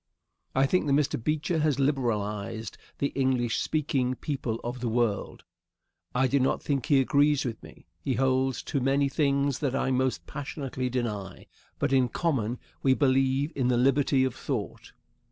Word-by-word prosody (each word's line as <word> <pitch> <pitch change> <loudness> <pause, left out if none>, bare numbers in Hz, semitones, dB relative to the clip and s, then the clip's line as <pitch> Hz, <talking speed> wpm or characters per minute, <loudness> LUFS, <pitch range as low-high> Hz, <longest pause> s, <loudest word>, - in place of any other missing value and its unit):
I 135 +1 +4
think 170 +2 +1
that 140 - +2
Mr. 140 -5 +1
Beecher 155 +3 0
has 150 -2 +2
liberalized 110 -6 -1 0.2
the 140 - 0
English 130 -3 0
speaking 135 -5 0
people 125 -5 -3
of 120 +1 -4
the 120 -1 -2
world. 115 -3 -1 0.7
I 130 +1 +3
do 140 +2 +2
not 130 +1 +1
think 140 -4 -1
he 140 -2 +5
agrees 145 +2 +3
with 115 -3 -4
me. - - -14
He 130 - -1
holds 130 0 +1
to 140 - -1
many 140 +2 +2
things 140 -1 +1
that 135 -3 -1
I 135 - 0
most 130 0 0
passionately 135 -3 -4
deny. 105 -7 -4 0.3
But - - 0
in 130 -2 +3
common, 125 -9 -1 0.2
we 130 -1 +4
believe 135 +2 +2
in 130 -3 +1
the 125 -1 +2
liberty 135 +1 +3
of 130 -2 0
thought. 125 -4 -5
130 Hz, 165 wpm, -28 LUFS, 125-140 Hz, 0.7 s, he